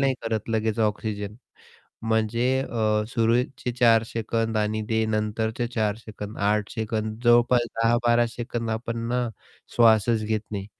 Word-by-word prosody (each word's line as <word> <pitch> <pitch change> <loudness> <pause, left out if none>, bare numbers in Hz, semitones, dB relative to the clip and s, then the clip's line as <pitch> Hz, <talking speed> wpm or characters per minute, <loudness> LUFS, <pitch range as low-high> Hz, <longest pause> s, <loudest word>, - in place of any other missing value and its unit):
नाही 135 -1 +2
करत 110 -2 -2
लगेच 110 0 0
ऑक्सिजन. 105 -1 -2 0.7
म्हणजे 110 +1 +1 0.2
अ, 110 -3 0
सुरूचे 120 +2 0
4 115 -2 +5
सेकंद 115 0 -2
आणि 110 0 0
ते 110 0 +1
नंतरचे 110 +2 -1
4 105 -2 +1
सेकंद 110 -2 -9
8 105 -1 0
सेकंद 110 -1 -3
जवळपास 120 +1 +5
10-12 120 +1 +3
सेकंद 115 0 -4
आपण 115 +1 -3
ना 125 0 0 0.5
श्वासच 110 -1 +4
घेत 110 0 0
नाही. 100 -2 -4
110 Hz, 135 wpm, -25 LUFS, 110-120 Hz, 0.7 s, 4